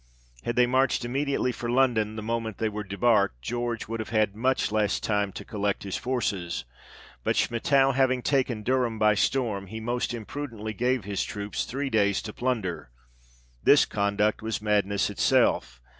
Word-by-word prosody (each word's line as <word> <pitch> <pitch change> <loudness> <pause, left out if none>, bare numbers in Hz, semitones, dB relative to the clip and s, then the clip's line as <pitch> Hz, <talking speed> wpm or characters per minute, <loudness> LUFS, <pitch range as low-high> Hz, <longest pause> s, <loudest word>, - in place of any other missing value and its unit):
Had 120 - -1
they 125 - +5
marched 130 0 +1
immediately 135 +1 0
for 120 -1 -5
London 120 -4 +2
the 110 - -5
moment 115 -2 -3
they 110 - 0
were 105 0 -5
debarked, 100 - +2
George 120 -1 -3
would 115 +1 -4
have 110 - -4
had 110 -3 +1
much 130 0 +1
less 105 -1 +1
time 105 -2 0
to - - -8
collect 100 -1 -2
his 100 -2 -4
forces; 95 - -2 0.6
but - - +1
Schmettau 135 +3 +3
having 130 -1 +2
taken 130 -6 0
Durham 125 -2 +1
by 105 0 +4
storm, 105 -2 0
he 110 +4 -6
most 120 +2 -2
imprudently 115 -2 -5
gave 125 +2 0
his 100 0 -2
troops 105 0 -4
three 135 +2 -3
days 100 -2 +2
to 105 - -6
plunder; 105 - -2 0.7
this - - +6
conduct 100 +1 0
was 110 0 -2
madness 105 -2 +1
itself. - - +2
110 Hz, 165 wpm, -27 LUFS, 105-125 Hz, 0.7 s, this